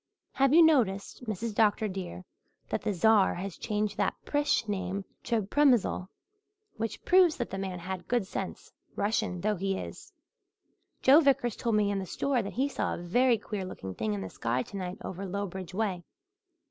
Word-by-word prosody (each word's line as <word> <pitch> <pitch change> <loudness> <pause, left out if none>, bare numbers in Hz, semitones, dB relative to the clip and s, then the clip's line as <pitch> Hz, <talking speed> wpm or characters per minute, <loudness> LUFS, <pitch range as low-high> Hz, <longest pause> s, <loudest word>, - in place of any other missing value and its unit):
Have 270 -1 +2
you 335 +3 +8
noticed, 245 -7 +2
Mrs. 220 +1 -3
Dr. 215 0 +3
dear, 185 -2 -6 0.4
that - - -1
the 215 - -1
Czar 205 +2 +4
has 190 0 -5
changed 210 -2 -2
that - - +1
Prish 290 -5 +1
name 195 -1 -3 0.2
to 230 -3 +1
Premysl, 240 -5 +2 0.7
which 225 0 -4
proves 360 -3 +5
that 240 - -3
the 195 - -3
man 190 -2 -3
had 180 +1 -6
good 240 -4 +1
sense, - - -6 0.2
Russian 200 -4 -1
though 210 +1 0
he 195 +1 -1
is? - - -8 0.9
Joe 275 +4 +8
Vickers 265 -6 +2
told 230 -2 0
me 205 -1 +2
in 200 - -1
the 190 - -5
store 270 +4 0
that 200 - -6
he 265 +4 +1
saw 280 - -2
a 175 - -8
very 240 +7 +3
queer 210 -2 -5
looking 95 - -7
thing 105 +1 -2
in 100 - -4
the 95 - -5
sky 120 +2 -1
tonight 185 -2 -6
over 190 +1 -5
Lowbridge 190 -2 -5
way. 195 -5 -1
205 Hz, 180 wpm, -29 LUFS, 185-235 Hz, 0.9 s, you